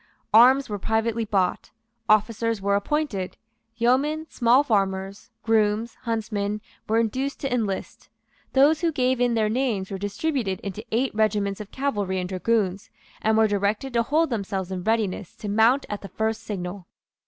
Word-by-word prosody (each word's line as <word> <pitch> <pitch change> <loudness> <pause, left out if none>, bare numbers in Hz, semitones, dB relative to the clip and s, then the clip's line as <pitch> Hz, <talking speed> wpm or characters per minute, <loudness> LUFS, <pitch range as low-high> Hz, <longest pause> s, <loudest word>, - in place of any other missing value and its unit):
Arms 255 +5 +7
were 205 -1 -4
privately 225 +2 0
bought; 195 -4 0 0.4
officers 220 +1 +2
were 200 +1 +1
appointed; 200 -5 -2 0.4
yeomen, 275 +7 +1
small 245 +3 +4
farmers, 195 -4 -1
grooms, 220 0 +1
huntsmen, 210 -2 -2 0.3
were 220 - +3
induced 255 +5 -1
to 270 -2 -1
enlist. 210 -6 -3 0.4
Those 290 +4 +4
who 335 -1 +2
gave 255 -3 +1
in 245 -1 +2
their 220 -1 +2
names 220 -5 -1
were 195 - -4
distributed 205 - -2
into 200 +2 -6
eight 250 +4 0
regiments 210 -2 0
of 205 - -9
cavalry 205 -9 -1
and 180 - -3
dragoons, 195 0 -1 0.3
and 220 0 +2
were 220 0 +5
directed 205 +5 -1
to 235 - +3
hold 310 +5 +1
themselves 195 -4 -3
in 185 -1 -4
readiness 210 -4 -1
to 210 - -7
mount 225 +6 +3
at 205 - -5
the 195 - -9
first 220 0 -2
signal. 190 -4 -6
220 Hz, 155 wpm, -24 LUFS, 200-245 Hz, 0.4 s, Arms